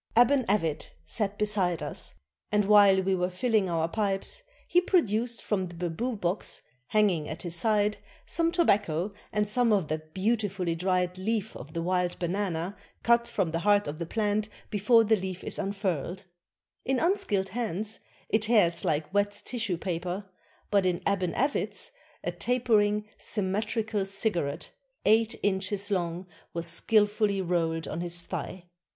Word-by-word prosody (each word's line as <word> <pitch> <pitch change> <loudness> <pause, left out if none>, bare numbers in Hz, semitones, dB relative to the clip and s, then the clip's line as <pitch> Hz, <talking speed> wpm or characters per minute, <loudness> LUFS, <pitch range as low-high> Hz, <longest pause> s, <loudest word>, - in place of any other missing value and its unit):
] - - -31
Aban 250 +1 +5
Avit 165 -7 0
sat 205 -2 -2
beside 195 -5 0
us, - - -5 0.4
and 210 -1 +3
while 200 -2 +6
we 190 +1 +1
were 180 -1 0
filling 205 +1 +1
our 165 -1 +1
pipes 195 - +1 0.3
he 355 - +4
produced 235 - +1
from 190 -3 -1
the 175 - -11
bamboo 180 +9 -2
box, 185 0 -3 0.2
hanging 195 -8 +2
at 155 - -5
his 175 -1 -3
side, 210 +3 +2 0.3
some 335 0 +1
tobacco 205 - +2 0.2
and 210 0 +1
some 235 +2 +2
of 195 -7 +2
that 155 0 -4
beautifully 200 -4 0
dried 180 +1 0
leaf 220 +1 -2
of 145 +5 -10
the 165 -1 -2
wild 180 0 0
banana 180 0 -2 0.3
cut 235 0 +4
from 195 -8 -1
the 165 - -1
heart 205 +2 +3
of 150 +2 -5
the 170 - -4
plant, 215 +1 0 0.2
before 220 +3 +5
the 220 0 +4
leaf 185 -2 -5
is - - -3
unfurled; 190 -2 -2 0.6
in 265 0 +1
unskilled 330 - +1
hands 215 -1 -2 0.3
it 220 - +2
tears 210 -7 +3
like 155 +3 -1
wet 205 0 +1
tissue 225 -8 -2
paper, 180 +2 -3 0.5
but 200 -2 +4
in 180 -2 +1
Aban 185 -4 0
Avit's 275 +4 -1 0.3
a - - -1
tapering, 215 -4 +1
symmetrical 210 +1 0
cigarette, 195 -7 -1 0.3
eight 225 +2 +3
inches 200 +1 -1
long, 175 -1 -1 0.3
was 170 0 -2
skillfully 205 +3 +3
rolled 165 -3 0
on 165 - -4
his 175 0 -2
thigh. 185 -1 -5
200 Hz, 155 wpm, -28 LUFS, 175-215 Hz, 0.6 s, while